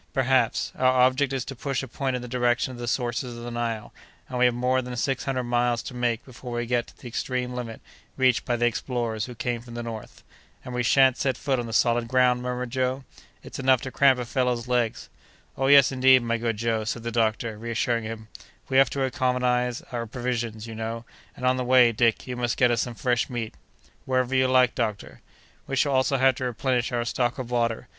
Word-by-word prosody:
"Perhaps. 130 -3 +1
Our 130 0 +3
object 130 +2 +2
is 135 -2 -2
to 135 - -7
push 135 +1 -3
a - - -6
point 130 +1 -2
in 125 - -4
the - - -6
direction 120 0 0
of 125 - -9
the 120 - -5
sources 120 0 -2
of 120 - -8
the 120 - -6
Nile; 115 -2 -3 0.3
and 125 - -4
we 125 - +5
have 125 - +4
more 125 +1 +1
than 125 -1 -6
six 130 +2 -1
hundred 130 -2 -1
miles 120 0 0
to - - -7
make 120 -2 -1
before 125 -1 -9
we 120 0 -2
get 120 0 0
to - - -18
the - - -10
extreme 125 +1 -3
limit 120 -3 -6 0.4
reached 130 -2 +3
by 120 - 0
the 120 0 +1
explorers 120 -2 -2
who 125 - -9
came 120 +1 -2
from 120 -1 -11
the 120 - -4
north." 115 -2 -8 0.4
"And 125 - -7
we 125 - 0
shan't 130 +2 +4
set 130 -3 0
foot 135 -3 -1
on 120 - -4
the - - -6
solid 120 +1 +2
ground?" 125 0 +3
murmured 125 -1 -4
Joe; 130 +1 -1 0.4
"it's - - -9
enough 130 -1 +4
to 130 - -6
cramp 135 -1 +4
a 125 - -3
fellow's 125 -1 -1
legs!" 120 -2 0 0.5
"Oh, 135 - 0
yes, 140 -1 +7
indeed, 130 -1 +5
my 115 0 -1
good 115 -2 -1
Joe," 115 0 0
said 110 +2 -4
the 115 - -3
doctor, 110 0 0
reassuring 115 0 -1
him; 110 0 -7 0.4
"we 130 - +2
have 135 0 +6
to 135 - -2
economize 125 -2 0
our 120 -2 -3
provisions, 115 -2 -3
you 115 - -8
know; 115 +1 -5 0.3
and 125 - -4
on 130 0 +3
the 130 - -1
way, 125 -1 +5
Dick, 115 0 +1
you 125 - -5
must 120 -1 -1
get 125 -1 +4
us 120 -1 +1
some 120 -2 -4
fresh 120 +1 0
meat." 120 -3 -4 0.5
"Whenever 130 0 0
you 130 0 +3
like, 130 -1 +4
doctor." 110 -4 -4 0.5
"We 135 - -2
shall 140 +1 +2
also 130 +1 +2
have 130 0 +4
to 130 - -3
replenish 125 0 -1
our 120 -1 -1
stock 120 +1 -1
of 125 -2 -6
water. 115 -2 0
125 Hz, 225 wpm, -25 LUFS, 120-130 Hz, 0.5 s, yes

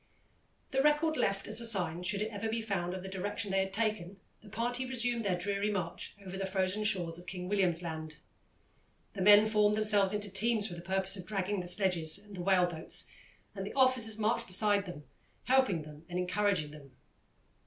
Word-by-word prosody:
The 270 -1 +2
record, 300 +2 +2
left 195 -8 -1
as - - +2
a - - 0
sign, 180 -6 +1
should 200 +3 0
it 220 - -5
ever 215 +1 -4
be 230 +1 -2
found, 190 -5 -3
of 185 - -7
the - - -7
direction 200 +2 -3
they 195 - +2
had 190 0 -1
taken, 200 -3 -2 0.2
the 215 - -15
party 240 +4 -2
resumed 245 -2 -1
their 190 -3 0
dreary 200 +3 -1
march 180 -5 -4
over 190 0 -7
the 195 0 -3
frozen 190 +2 -1
shores 175 -5 0
of 175 - -15
King 180 -1 -6
William's 180 -4 +1
Land. 160 -2 -6 1.0
The 195 - -5
men 205 +2 +7
formed 210 -1 +2
themselves 205 -3 +4
into 205 -2 -1
teams 215 +1 +3
for 175 - -7
the 170 - -8
purpose 190 +2 0
of 185 - -9
dragging 200 -1 -2
the 180 - -5
sledges 175 -4 +2
and 205 0 -12
whale 180 0 +3
boats, 170 -2 -2 0.4
and - - -5
the - - -7
officers 255 -5 +3
marched 220 +1 0
beside 200 +1 +2
them, 165 -4 -8 0.4
helping 255 -11 +2
them 150 0 -12
and 175 - -4
encouraging 180 -3 0
them. 140 -3 -14
195 Hz, 195 wpm, -31 LUFS, 180-215 Hz, 1.0 s, men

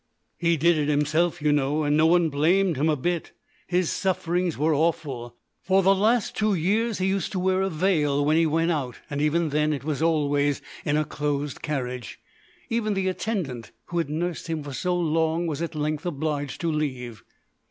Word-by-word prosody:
"He 170 -1 +2
did 170 +1 +3
it 145 - 0
himself, 150 +3 +1
you 150 - +3
know, 145 +1 +1
and 145 0 +2
no 155 +1 +5
one 170 -1 +4
blamed 170 +5 +2
him 150 +4 +1
a 155 - +3
bit; 170 +4 -2 0.3
his 180 -1 +1
sufferings 180 -2 -1
were 155 +3 +2
awful. 140 -6 -1 0.3
For 190 0 +2
the 195 +2 +6
last 215 +3 +1
two 215 -2 +1
years 210 +6 +1
he 185 - -1
used 190 -2 0
to 185 - -1
wear 185 +1 +1
a 195 - +1
veil 155 -5 +1
when 155 +1 +3
he 165 0 +4
went 165 +2 +1
out, 130 -7 -2 0.2
and 140 0 -2
even 155 +2 +1
then 150 +1 +1
it 140 - -4
was 155 0 -2
always 145 -3 +2 0.3
in 150 -1 +1
a 155 - +1
closed 145 -1 -3
carriage. 125 -7 -4 0.5
Even 215 -3 -1
the 190 -1 0
attendant 180 - -3 0.2
who 175 - -1
had 165 - -1
nursed 170 +3 -3
him 160 -2 -3
for 145 -1 -7
so 180 +5 -1
long 165 0 +1
was 155 -2 -3
at 170 -1 -4
length 150 +2 -2
obliged 145 -3 -3
to 170 -1 0
leave. 130 -7 -3
160 Hz, 195 wpm, -25 LUFS, 145-175 Hz, 0.5 s, the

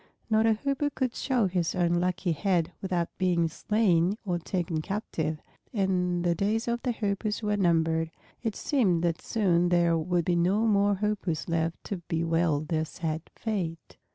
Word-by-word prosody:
Not 220 +1 +4
a 225 - +5
Hoopoe 280 +5 -1
could 255 -3 0
show 250 -6 +1
his 180 -2 0
unlucky 175 +1 +1
head 170 0 +1
without 180 -3 -2
being 175 -3 +2
slain 185 +1 +1
or 175 -3 0
taken 170 -2 -2
captive, 160 -5 -3 0.3
and 180 -3 +1
the 175 -1 +2
days 210 +7 0
of 235 0 -1
the 250 - 0
Hoopoes 210 -1 -2
were 210 0 +1
numbered. 165 -3 +2 0.3
It 225 -3 -2
seemed 195 - +1
that 170 -1 0
soon 175 -6 +2
there 170 -1 +3
would 170 +1 0
be 175 - +2
no 190 +6 +2
more 205 -2 +3
Hoopoes 190 - -2
left 165 0 -1
to 200 - -4
bewail 165 -2 0
their 155 0 -1
sad 160 0 -3
fate. 180 -7 -4
180 Hz, 160 wpm, -28 LUFS, 165-210 Hz, 0.3 s, a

